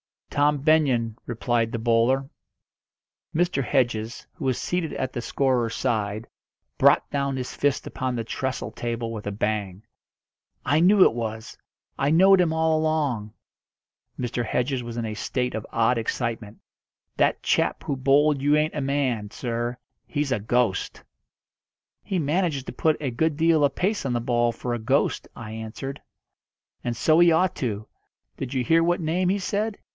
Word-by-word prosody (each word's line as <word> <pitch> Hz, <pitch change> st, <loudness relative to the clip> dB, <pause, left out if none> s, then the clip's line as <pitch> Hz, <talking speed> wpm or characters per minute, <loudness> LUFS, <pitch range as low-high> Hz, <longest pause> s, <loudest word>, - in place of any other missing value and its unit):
"Tom 145 Hz, 0 st, +2 dB
Benyon," 135 Hz, -7 st, +2 dB
replied 115 Hz, -1 st, 0 dB
the 115 Hz, -, -2 dB
bowler. 120 Hz, +4 st, +2 dB, 1.1 s
Mr. 170 Hz, -5 st, +1 dB
Hedges, 120 Hz, -4 st, -1 dB
who 165 Hz, -6 st, -7 dB
was 130 Hz, -2 st, +1 dB
seated 175 Hz, -3 st, -2 dB
at 130 Hz, -1 st, -2 dB
the 120 Hz, -, -3 dB
scorer's 125 Hz, -3 st, 0 dB
side, 110 Hz, -3 st, -1 dB, 0.5 s
brought -, -, +5 dB
down 140 Hz, -1 st, -1 dB
his 130 Hz, -1 st, -4 dB
fist 145 Hz, -1 st, 0 dB
upon 130 Hz, -1 st, -3 dB
the 115 Hz, -, -2 dB
trestle 130 Hz, +3 st, -3 dB
table 115 Hz, -1 st, -4 dB
with 105 Hz, -2 st, -6 dB
a -, -, -1 dB
bang. 100 Hz, -1 st, -2 dB, 0.8 s
"I 145 Hz, +4 st, +3 dB
knew 190 Hz, +3 st, +6 dB
it -, -, +4 dB
was! 110 Hz, -1 st, -5 dB, 0.4 s
I 140 Hz, -, +2 dB
knowed 190 Hz, +3 st, +6 dB
him 170 Hz, -3 st, +2 dB
all 160 Hz, -1 st, +2 dB
along!" 145 Hz, -9 st, -1 dB, 0.8 s
Mr. 120 Hz, -1 st, -2 dB
Hedges 125 Hz, +3 st, -1 dB
was 120 Hz, -1 st, -7 dB
in 115 Hz, -, -2 dB
a 110 Hz, -, -4 dB
state 125 Hz, +3 st, -2 dB
of 110 Hz, -, -5 dB
odd 115 Hz, +1 st, +2 dB
excitement. 115 Hz, -2 st, -3 dB, 0.6 s
"That -, -, +2 dB
chap -, -, +1 dB
who 140 Hz, -, -2 dB
bowled 140 Hz, +2 st, +3 dB
you 145 Hz, +2 st, +3 dB
ain't 150 Hz, +1 st, +1 dB
a 150 Hz, -, -2 dB
man, 135 Hz, -6 st, -1 dB
sir 120 Hz, +1 st, -3 dB, 0.3 s
he's 145 Hz, -2 st, -2 dB
a 125 Hz, -, +1 dB
ghost." 110 Hz, -2 st, 0 dB, 1.0 s
"He 190 Hz, -, -3 dB
manages 155 Hz, -2 st, 0 dB
to -, -, -7 dB
put 155 Hz, -1 st, +1 dB
a 135 Hz, -4 st, -1 dB
good 160 Hz, +5 st, 0 dB
deal 165 Hz, -1 st, +3 dB
of 140 Hz, -, -1 dB
pace 205 Hz, 0 st, 0 dB
on 130 Hz, -, 0 dB
the 120 Hz, -, 0 dB
ball 120 Hz, -1 st, +1 dB
for 120 Hz, +1 st, -4 dB
a 120 Hz, -, -2 dB
ghost," 130 Hz, +6 st, 0 dB
I 110 Hz, -2 st, -8 dB
answered. 110 Hz, +5 st, -6 dB, 0.8 s
"And 120 Hz, -1 st, -2 dB
so 155 Hz, +6 st, +4 dB
he 175 Hz, -1 st, +6 dB
ought 180 Hz, +2 st, +3 dB
to. 110 Hz, -4 st, -3 dB, 0.5 s
Did 130 Hz, -1 st, -5 dB
you 130 Hz, -, +1 dB
hear 165 Hz, +7 st, +4 dB
what 175 Hz, +1 st, +1 dB
name 170 Hz, +3 st, 0 dB
he 195 Hz, -, +2 dB
said? 205 Hz, +2 st, -2 dB
130 Hz, 170 wpm, -25 LUFS, 115-155 Hz, 1.1 s, knew